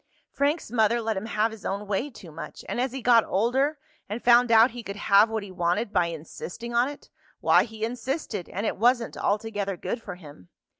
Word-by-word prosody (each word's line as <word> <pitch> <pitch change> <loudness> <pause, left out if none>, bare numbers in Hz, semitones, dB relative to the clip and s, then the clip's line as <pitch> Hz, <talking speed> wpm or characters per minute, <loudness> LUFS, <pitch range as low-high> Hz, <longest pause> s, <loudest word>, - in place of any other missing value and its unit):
Frank's 285 -2 -1
mother 235 0 +3
let 225 -1 -1
him 195 +3 -4
have 220 0 +1
his 220 -2 -11
own 200 +2 -3
way 210 +8 -1
too 185 - -13
much, 160 +2 -9
and 245 - -2
as 255 0 -1
he 265 -1 -6
got 235 -2 +6
older 260 +9 +1 0.3
and 215 +4 -5
found 240 0 +5
out 225 +2 +7
he 240 +1 -7
could 200 -3 -7
have 205 +1 +4
what 220 -2 -2
he 200 - -9
wanted 185 +5 -1
by 180 -3 +3
insisting 170 +8 -7
on 240 +3 +3
it, 290 - -12 0.3
why - - +4
he 220 -1 -4
insisted, 240 - -4
and 200 +3 -3
it - - -1
wasn't 240 +1 +2
altogether 205 -2 -1
good 235 - -4
for 200 -5 -7
him. 145 - -14
225 Hz, 210 wpm, -26 LUFS, 200-240 Hz, 0.3 s, out